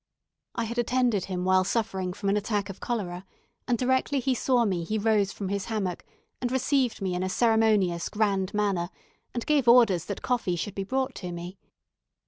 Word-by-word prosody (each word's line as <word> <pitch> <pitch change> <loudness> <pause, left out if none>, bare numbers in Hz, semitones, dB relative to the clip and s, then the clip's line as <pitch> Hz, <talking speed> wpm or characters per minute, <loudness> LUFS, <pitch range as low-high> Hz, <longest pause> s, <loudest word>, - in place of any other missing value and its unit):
I 235 - -1
had 235 +2 -3
attended 240 -5 +1
him 180 -1 -3
while 185 0 +4
suffering 190 -3 -1
from 200 +2 -3
an 200 - +2
attack 205 -1 -1
of 190 - -13
cholera, 185 -7 -3 0.4
and 245 -2 +2
directly 260 +3 +1
he 260 +1 +1
saw 250 -1 +2
me 185 -5 -1
he 215 +6 -2
rose 210 -2 +2
from 195 -2 -5
his 200 -1 -2
hammock, 200 -6 -3 0.4
and 245 -1 -1
received 260 -4 +1
me 185 -1 -1
in 180 - -2
a 185 - -1
ceremonious, 215 -6 +2
grand 200 -3 0
manner, 200 -5 0 0.5
and 240 - -2
gave 290 -5 +2
orders 230 -8 +6
that 200 - -5
coffee 235 -8 0
should 180 +4 -4
be 195 - -3
brought 260 +5 -1
to 180 -2 -5
me. 175 +3 -7
205 Hz, 190 wpm, -27 LUFS, 185-240 Hz, 0.5 s, orders